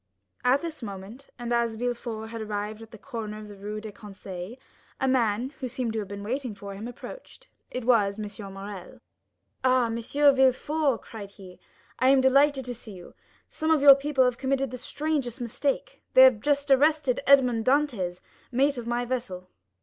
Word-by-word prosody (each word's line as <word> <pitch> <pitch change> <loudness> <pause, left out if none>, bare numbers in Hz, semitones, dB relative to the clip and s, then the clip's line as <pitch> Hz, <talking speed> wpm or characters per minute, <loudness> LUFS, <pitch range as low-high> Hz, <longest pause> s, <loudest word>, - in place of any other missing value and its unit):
At 255 +4 +3
this 325 -3 -6
moment, 210 +5 -9
and 240 -1 -3
as 235 -1 +1
Villefort 235 -2 -4
had 230 -1 -5
arrived 210 0 -4
at 225 - -11
the 225 - -12
corner 220 -4 -6
of 215 0 -9
the 205 - -11
Rue 205 +2 -6
des 215 0 -8
Conseils, 195 0 -9 0.4
a 265 - +1
man, 245 -1 +1
who 260 - -3
seemed 235 -1 -3
to 220 - -1
have 205 - -4
been 200 +1 -7
waiting 250 0 -3
for 200 0 -8
him, 205 +4 -7
approached; - - -11 0.2
it 250 -2 -5
was 210 -5 +3
M. 205 -1 -6
Morrel. 195 -1 -9 0.6
"Ah, 255 -1 +4
M. 225 0 -2
de 280 +5 +3
Villefort," 265 0 +2
cried 205 -3 -9
he, 190 -3 -14 0.4
"I 255 - +4
am 270 0 +6
delighted 270 +1 +4
to 250 - -4
see 225 -3 -11
you. 180 -2 -12 0.3
Some 315 - -3
of 315 -3 +3
your 280 -1 +11
people 275 -1 +1
have 250 -1 0
committed 270 -1 0
the 255 - -6
strangest 285 -2 -2
mistake—they 260 - +1
have 255 -5 +6
just 285 +3 0
arrested 280 -1 +3
Edmond 250 -5 +5
Dantès, 245 -11 +1 0.3
mate 270 +2 +2
of 235 - -7
my 240 +1 -1
vessel." 215 -8 -4
240 Hz, 185 wpm, -27 LUFS, 210-270 Hz, 0.6 s, your